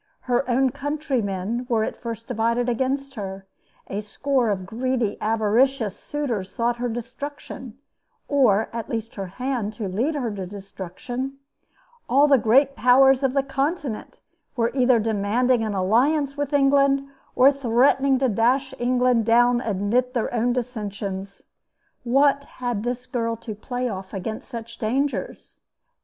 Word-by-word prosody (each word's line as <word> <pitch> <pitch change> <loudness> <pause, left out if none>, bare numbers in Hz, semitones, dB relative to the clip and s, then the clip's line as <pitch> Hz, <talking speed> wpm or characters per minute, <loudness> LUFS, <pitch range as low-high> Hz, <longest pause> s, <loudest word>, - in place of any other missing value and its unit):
Her 250 +1 0
own 260 +1 +3
countrymen 250 - -2
were 225 -2 +2
at - - -3
first 230 -1 -6
divided 235 0 0
against 265 +3 -1
her; 195 -4 -6 0.4
a 200 +2 -4
score 250 +3 0
of 190 -3 -2
greedy, 235 0 -1
avaricious 225 +1 +2
suitors 240 -10 -3
sought 240 0 0
her 245 0 -2
destruction, 255 +1 -7 0.5
or 225 -7 +3
at 230 -1 -5
least 225 0 -4
her 195 -2 -5
hand 240 +1 -3
to 210 -2 -4
lead 235 +12 -1
her 245 -7 -2
to 190 -2 -5
destruction; 205 +7 -6 0.7
all 280 +4 +5
the 275 -3 +5
great 270 +5 +4
powers 265 +1 +5
of 265 -2 +1
the 275 -1 +2
Continent 275 -2 -3 0.3
were 235 -1 +1
either 255 -2 +4
demanding 225 +3 +1
an 215 -2 -2
alliance 270 +9 +2
with 290 -1 -3
England 275 -1 +3 0.3
or 265 +2 +7
threatening 270 +1 +3
to 260 0 +2
dash 255 +5 +1
England 250 -1 +2
down 240 +1 +4
amid 225 +5 0
their 235 - -1
own 240 +1 +1
dissensions. 205 -5 -4 0.6
What 275 +3 +3
had 245 -6 -4
this 245 +2 -3
girl 230 -2 -2
to 225 -1 -7
play 245 +4 -3
off 190 -3 -6
against 215 +3 -5
such 230 -2 -8
dangers? 270 +6 -2
245 Hz, 145 wpm, -24 LUFS, 220-270 Hz, 0.7 s, or